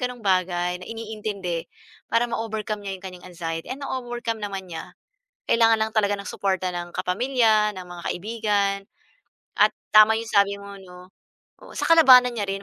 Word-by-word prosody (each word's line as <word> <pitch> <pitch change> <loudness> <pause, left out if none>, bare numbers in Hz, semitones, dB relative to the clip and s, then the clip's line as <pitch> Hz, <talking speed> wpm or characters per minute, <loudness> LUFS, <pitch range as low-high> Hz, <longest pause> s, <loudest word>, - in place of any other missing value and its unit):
gano'ng 250 -2 -4
bagay, 180 -1 0
na - - -10
iniintindi 210 -6 -5 0.4
para 235 +1 +2
ma-overcome 220 -2 -3
niya 195 - -3
'yong 185 - -19
kanyang 180 -1 -9
anxiety 165 -2 -5
and 275 +2 -6
na-overcome 240 -4 -4
naman 195 -2 -5
niya. 160 - -8 0.5
Kailangan 225 -1 +4
lang 220 0 0
talaga 205 -1 +2
ng 200 - -7
suporta 190 -2 -1
ng 175 -1 -6
kapamilya, 215 0 +2
ng 185 -1 -9
mga 175 -1 -10
kaibigan, 205 -1 0 0.9
at - - +6 0.2
tama 215 +1 +8
'yong 230 0 -6
sabi 200 0 +3
mo, 200 0 -10
'no. 180 -1 -14 0.5
Oo, - - -13
saka 330 - +4
labanan 250 -4 +7
niya 205 -2 -2
rin, 195 0 -3
205 Hz, 165 wpm, -24 LUFS, 185-225 Hz, 0.9 s, tama